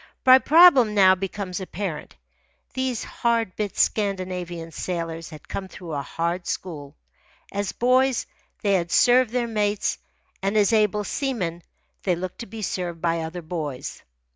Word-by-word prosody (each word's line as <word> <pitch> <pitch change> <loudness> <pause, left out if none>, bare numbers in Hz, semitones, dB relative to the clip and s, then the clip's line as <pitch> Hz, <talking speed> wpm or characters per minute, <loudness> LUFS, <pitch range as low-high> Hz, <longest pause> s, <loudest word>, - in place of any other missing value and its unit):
My 260 0 +9
problem 275 -9 +6
now 190 -2 +7
becomes 190 0 -4
apparent. 185 -4 -5 0.6
These 260 -3 -2
hard 230 -5 -1
bit 205 -3 -3
Scandinavian 180 -5 -1
sailors 165 -1 -4
had 155 - -12
come 190 - -5
through 175 -3 -9
a 140 - -1
hard 170 +4 -3
school. 145 -6 -5 0.6
As 200 -2 -2
boys 255 +1 +2 0.4
they 200 -1 +2
had 175 -3 +1
served 250 0 +5
their 245 +1 0
mates, 210 -2 -1 0.4
and 195 +2 0
as 210 +1 +3
able 210 -1 +2
seamen 200 - -2 0.4
they 180 -3 +1
looked 180 +1 -6
to 235 - -6
be 220 +2 -7
served 175 -3 -3
by 165 0 0
other 165 +2 -5
boys. 155 -6 -5
190 Hz, 145 wpm, -24 LUFS, 170-225 Hz, 0.6 s, My